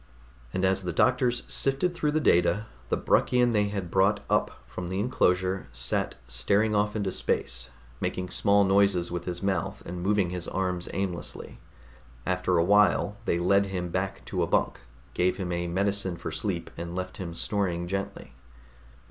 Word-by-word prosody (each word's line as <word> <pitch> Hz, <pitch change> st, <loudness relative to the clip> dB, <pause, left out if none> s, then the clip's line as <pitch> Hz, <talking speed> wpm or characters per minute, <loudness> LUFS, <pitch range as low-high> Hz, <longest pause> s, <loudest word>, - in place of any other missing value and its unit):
And 95 Hz, 0 st, 0 dB
as 95 Hz, +1 st, +2 dB
the 90 Hz, -2 st, -3 dB
doctors 125 Hz, +5 st, +2 dB
sifted 140 Hz, +6 st, +1 dB
through 150 Hz, -3 st, 0 dB
the 155 Hz, -, +3 dB
data, 105 Hz, -, +3 dB, 0.2 s
the -, -, +1 dB
Bruckian 125 Hz, -1 st, +3 dB
they 105 Hz, -1 st, +3 dB
had 100 Hz, -4 st, -4 dB
brought 95 Hz, +2 st, +3 dB
up -, -, +3 dB, 0.2 s
from 75 Hz, +9 st, -6 dB
the 95 Hz, +2 st, -2 dB
enclosure 95 Hz, -, +1 dB
sat 60 Hz, 0 st, 0 dB
staring 100 Hz, -, +1 dB
off 105 Hz, +1 st, +1 dB
into 100 Hz, -3 st, -1 dB
space, -, -, -2 dB, 0.3 s
making 90 Hz, -1 st, -3 dB
small 100 Hz, +2 st, +4 dB
noises 95 Hz, -3 st, +3 dB
with 85 Hz, 0 st, -4 dB
his 90 Hz, +1 st, -4 dB
mouth 95 Hz, +1 st, -2 dB
and 90 Hz, 0 st, -5 dB
moving 100 Hz, -1 st, +1 dB
his 90 Hz, -1 st, -4 dB
arms 90 Hz, -2 st, -2 dB
aimlessly. 95 Hz, -3 st, -4 dB, 0.7 s
After 90 Hz, -1 st, +1 dB
a 85 Hz, -, +4 dB
while 105 Hz, +2 st, +3 dB
they 85 Hz, -, +1 dB
led 100 Hz, +3 st, +3 dB
him 90 Hz, -2 st, -3 dB
back -, -, -3 dB
to -, -, -2 dB
a -, -, +1 dB
bunk, -, -, +1 dB, 0.3 s
gave 90 Hz, +1 st, +1 dB
him 90 Hz, -2 st, -3 dB
a 85 Hz, 0 st, -1 dB
medicine 95 Hz, 0 st, 0 dB
for 85 Hz, -, -5 dB
sleep -, -, -3 dB
and 85 Hz, +1 st, -6 dB
left 95 Hz, 0 st, -4 dB
him 85 Hz, -3 st, -6 dB
snoring 90 Hz, -4 st, -1 dB
gently. 100 Hz, -6 st, -4 dB
95 Hz, 170 wpm, -27 LUFS, 90-100 Hz, 0.7 s, small